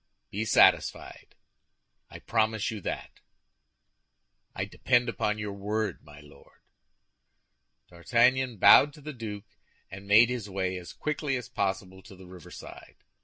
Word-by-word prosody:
"Be 105 +3 -3
satisfied; - - +2 0.7
I - - -10
promise 110 -1 -1
you 110 -2 -7
that." - - -6 1.4
"I - - -2
depend 125 -1 +1
upon 105 -2 -2
your 105 -1 -5
word, 105 0 -3
my 75 -1 -15
Lord." 75 -1 -20 1.3
D'Artagnan 120 +7 +1
bowed 145 +9 +7
to 150 - -15
the 150 +1 -7
duke, 110 -4 -7 0.5
and 95 +1 -10
made 110 +4 +6
his 120 -5 -4
way 95 -1 -2
as 90 -1 -9
quickly 150 -3 -2
as 125 - -8
possible 95 -1 -3
to 95 0 -14
the 95 0 -14
riverside. 90 -2 -12
105 Hz, 130 wpm, -28 LUFS, 95-120 Hz, 1.4 s, bowed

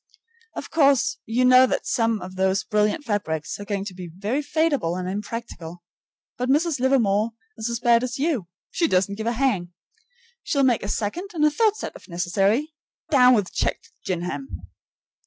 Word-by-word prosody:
Of - - -7
course 280 -5 +3
you 240 +3 +2
know 255 +1 +7
that - - -2
some 230 -4 0
of 185 +1 -9
those 190 +1 +1
brilliant 210 +8 0
fabrics 160 -9 -2
are 205 - -7
going 200 -1 -3
to 200 - -6
be 180 -1 -8
very 205 - -2
fadeable 290 - 0
and 180 - -4
impractical. 190 -4 -6 0.6
But 250 +1 -1
Mrs. 300 +1 +2
Livermore 230 -4 +2 0.3
is 220 - -2
as 235 -1 -2
bad 235 0 +4
as 250 -1 -3
you 275 - -1 0.2
she 335 - +1
doesn't 190 -4 +1
give 220 +2 -4
a 235 - +1
hang. 215 -9 0 0.7
She'll 280 -2 0
make 250 -3 +3
a - - -5
second 225 - -3
and 305 -2 +3
a 300 - +4
third 430 +5 +2
set - - -6
if - - -14
necessary. 195 - 0 0.4
DOWN 250 -3 +6
WITH 205 -4 -1
CHECKED - - -2
GINGHAM! 175 -7 -3
225 Hz, 175 wpm, -23 LUFS, 190-270 Hz, 0.7 s, know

